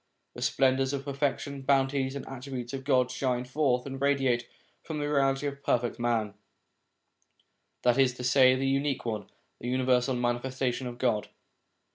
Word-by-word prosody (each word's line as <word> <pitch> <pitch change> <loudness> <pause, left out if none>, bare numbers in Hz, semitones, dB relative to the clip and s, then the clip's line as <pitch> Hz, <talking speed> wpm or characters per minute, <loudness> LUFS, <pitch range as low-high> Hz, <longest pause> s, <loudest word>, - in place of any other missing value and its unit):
The - - -9
splendours 135 0 +2
of 140 -1 -3
the 140 - -3
perfections, 140 0 -2
bounties, 135 0 +1
and 140 - -6
attributes 130 -2 -6
of 135 -1 -4
God 130 -2 +2
shine 125 -1 -1
forth 130 -2 +1
and 135 -1 -6
radiate 135 -4 +2 0.3
from 160 - -5
the 145 - -2
reality 135 -1 +1
of 140 -1 -3
the - - -29
Perfect 120 -3 0
Man, 115 -4 0 1.5
that 125 +1 +3
is 130 -2 +4
to 125 - -7
say 130 0 +5
the 135 +1 -1
Unique 135 0 0
One, 110 -4 -3 0.3
the 120 - -6
universal 125 0 +2
Manifes 120 +2 -2
tation 125 -1 0
of 120 -1 -7
God. 120 -5 0
130 Hz, 170 wpm, -29 LUFS, 125-135 Hz, 1.5 s, say